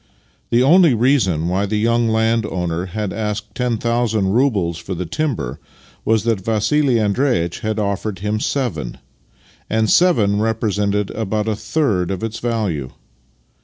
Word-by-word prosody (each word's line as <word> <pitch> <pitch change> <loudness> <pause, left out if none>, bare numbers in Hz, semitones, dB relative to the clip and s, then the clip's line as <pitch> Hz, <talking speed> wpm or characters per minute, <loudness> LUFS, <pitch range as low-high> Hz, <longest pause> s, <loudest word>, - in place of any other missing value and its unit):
The 120 +2 +3
only 165 -1 +5
reason 115 - +2
wh3^ 95 +3 0
the 105 - 0
young 115 +1 +2
landowner 105 -6 0
had 105 +1 -4
asked 105 -1 -4
ten 125 -1 -1
thousand 115 -3 0
roubles 100 -10 +1
for 95 +2 -5
the 90 +1 -4
timber 120 - -3 0.4
was 110 -1 +2
that 115 -4 0
Vassili 120 +6 +1
Andreitch 105 -5 0
had 110 0 -2
offered 100 -1 -2
him 105 +3 -2
seven 90 - -2 0.4
— - - -36 0.3
and 110 -1 +1
seven 110 - +3
represented 105 -2 0
about 110 0 -2
a 110 - 0
third 110 - 0
of 95 +2 -4
its 110 0 -4
value. 105 - -2
110 Hz, 145 wpm, -19 LUFS, 95-115 Hz, 0.4 s, only